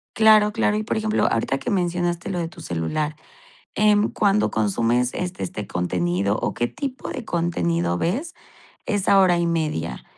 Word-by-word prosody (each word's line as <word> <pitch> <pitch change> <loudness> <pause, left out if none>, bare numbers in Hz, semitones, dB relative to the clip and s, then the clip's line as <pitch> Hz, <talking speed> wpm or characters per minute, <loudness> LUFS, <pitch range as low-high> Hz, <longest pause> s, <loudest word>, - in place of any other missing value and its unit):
Claro, 215 -1 +6
claro, 220 -1 +1
y 215 - -1
por - - -2
ejemplo 215 0 +1
ahorita 135 +4 0
que - - -4
mencionaste 175 -2 -1
lo 180 -2 -2
de 165 - -2
tu - - -13
celular, 150 - -2 0.6
em, 210 0 +3
cuando 205 0 +2
consumes 115 +4 +1
este 180 +1 -4
este 105 - -5
contenido 90 +3 -1
o - - -2
qué 120 - -1
tipo 270 -2 -6
de 245 - -5
contenido 85 - 0
ves 285 - -2 0.5
esa 200 -1 +3
hora 180 -2 +4
y 170 - +1
media, 150 - -2
170 Hz, 165 wpm, -23 LUFS, -, 0.6 s, Claro